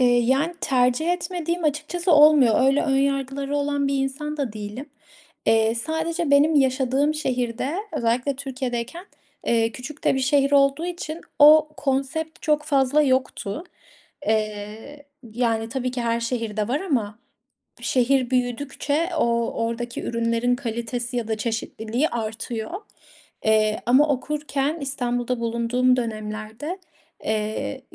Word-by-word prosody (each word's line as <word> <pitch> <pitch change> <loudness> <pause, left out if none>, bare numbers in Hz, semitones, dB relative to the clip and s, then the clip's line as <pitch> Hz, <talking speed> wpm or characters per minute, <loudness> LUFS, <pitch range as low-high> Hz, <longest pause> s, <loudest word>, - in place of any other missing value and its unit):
Eee, 245 -1 +5
yani, 270 +8 +1
tercih 255 +6 +2
etmediğim 350 -1 -3
açıkçası 310 +4 0
olmuyor. 295 -6 +7
Eee, 260 - +4
öyle 275 +2 +3
ön 270 -2 +1
yargıları 275 +1 -1
olan 285 -1 0
bir 275 - 0
insan 300 +3 -4
da 270 -7 -2
değilim. 215 +6 -7 0.6
Eee, 225 0 +3
sadece 320 +5 -2
benim 290 +3 +5
yaşadığım 270 +1 +2
şehirde 255 -2 -2 0.2
özellikle 245 +4 0
Türkiye'deyken, 260 +4 -4 0.4
eee, 230 -1 +2
küçük 280 +4 -9
de - - +3
bir 265 - 0
şehir 275 +1 +2
olduğu 280 +4 +3
için 340 -2 -5 0.2
o 305 +1 +8
konsept 285 +4 -2
çok 300 -1 +2
fazla 280 0 +3
yoktu. 260 - -1 0.6
Eee, 215 +6 -3 0.3
yani, 225 -2 0
tabii 255 +1 -2
ki 250 -1 -3
her 235 0 0
şehirde 230 -3 -2
var 275 +5 0
ama 230 - -1 0.6
şehir 255 0 +2
büyüdükçe 280 +6 -1
o - - +3
o 235 -1 0
oradaki 235 +1 -4
ürünlerin 230 +1 0
kalitesi 240 0 -4
ya 235 -2 -2
da 220 -1 -1
çeşitliliği 225 +4 -2
artıyor. 225 +2 -4 0.7
Eee, 215 0 +3
ama 265 +5 +5
okurken 290 +2 -1
İstanbul'da 245 -3 -2
bulunduğum 235 +2 +1
dönemlerde, 220 - -4 0.5
eee, 220 +4 -2
260 Hz, 130 wpm, -23 LUFS, 230-290 Hz, 0.7 s, o